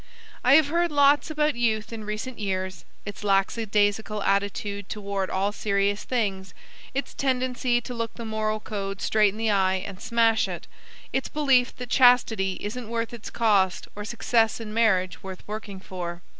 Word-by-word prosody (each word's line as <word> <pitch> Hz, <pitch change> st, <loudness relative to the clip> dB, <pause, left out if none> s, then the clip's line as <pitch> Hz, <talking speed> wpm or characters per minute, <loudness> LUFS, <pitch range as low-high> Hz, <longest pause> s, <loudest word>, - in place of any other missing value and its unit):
I 260 Hz, +3 st, +6 dB
have 310 Hz, -2 st, +5 dB
heard 340 Hz, +1 st, +1 dB
lots 285 Hz, +1 st, +4 dB
about 300 Hz, -1 st, +1 dB
Youth 225 Hz, -2 st, -1 dB
in 220 Hz, -2 st, -6 dB
recent 215 Hz, +4 st, -5 dB
years 185 Hz, -5 st, -3 dB, 0.2 s
its 205 Hz, 0 st, -7 dB
lackadaisical 205 Hz, +1 st, +1 dB
attitude 200 Hz, 0 st, -1 dB
toward 200 Hz, -2 st, -3 dB
all 195 Hz, +2 st, 0 dB
serious 200 Hz, -1 st, 0 dB
things, 195 Hz, -7 st, -2 dB, 0.4 s
its 275 Hz, -, -3 dB
tendency 250 Hz, -2 st, 0 dB
to 250 Hz, -, -7 dB
look 230 Hz, -1 st, -4 dB
the 235 Hz, -, -7 dB
moral 215 Hz, 0 st, -1 dB
code 195 Hz, -2 st, -5 dB
straight 210 Hz, -2 st, +3 dB
in 210 Hz, -, -11 dB
the 220 Hz, -1 st, +1 dB
eye 190 Hz, -2 st, +3 dB
and 195 Hz, -1 st, -8 dB
smash 230 Hz, -1 st, +2 dB
it, -, -, -6 dB, 0.5 s
its 265 Hz, -, -1 dB
belief 270 Hz, -4 st, +2 dB
that 250 Hz, -1 st, -8 dB
chastity 235 Hz, -7 st, +4 dB
isn't 225 Hz, +2 st, -5 dB
worth 230 Hz, 0 st, -2 dB
its 235 Hz, -2 st, -7 dB
cost 200 Hz, -5 st, +2 dB
or 210 Hz, -, -5 dB
success 225 Hz, 0 st, +1 dB
in 215 Hz, -2 st, -7 dB
marriage 190 Hz, -5 st, +2 dB
worth 190 Hz, -2 st, -9 dB
working 210 Hz, -2 st, -6 dB
for. 175 Hz, -2 st, -6 dB
215 Hz, 165 wpm, -25 LUFS, 200-240 Hz, 0.5 s, I